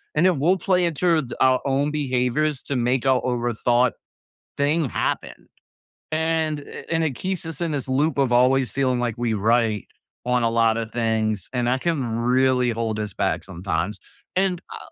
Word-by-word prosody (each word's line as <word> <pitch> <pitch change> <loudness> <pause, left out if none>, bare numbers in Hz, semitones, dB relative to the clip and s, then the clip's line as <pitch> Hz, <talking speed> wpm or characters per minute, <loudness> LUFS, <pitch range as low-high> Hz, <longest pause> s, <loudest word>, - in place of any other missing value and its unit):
and 155 +4 +3
then 180 -4 +2
we'll 175 +7 +3
play 180 -1 +2
it 165 -4 -2
through 170 -1 +3
it 130 -5 -5
our 130 -1 +4
own 140 +1 +1
behaviors 135 0 0
to 140 - -3
make 125 +1 0
our 130 -1 +3
overthought 120 0 +1 0.6
thing 145 +1 +1
happen. - - -3 0.6
And 160 -1 0 0.3
and 165 -1 +1
it 155 - 0
keeps 185 -2 -3
us 165 -2 -5
in 165 -2 -1
this 140 -3 -3
loop 140 +3 +1
of 135 -3 +2
always 130 0 +3
feeling 130 0 0
like 120 -2 -1
we 120 -1 0
right 110 0 +1 0.4
on 125 0 +2
a 115 - +2
lot 115 -1 +3
of 115 -1 -4
things, 110 -4 -1
and 125 -1 0
that 130 +1 +1
can 165 -6 0 0.2
really 125 +1 +2
hold 110 -2 -2
us 105 -4 -4
back - - -1
sometimes. 90 +1 -3 0.4
And 185 -2 +1
I - - -7
130 Hz, 180 wpm, -23 LUFS, 115-150 Hz, 0.6 s, our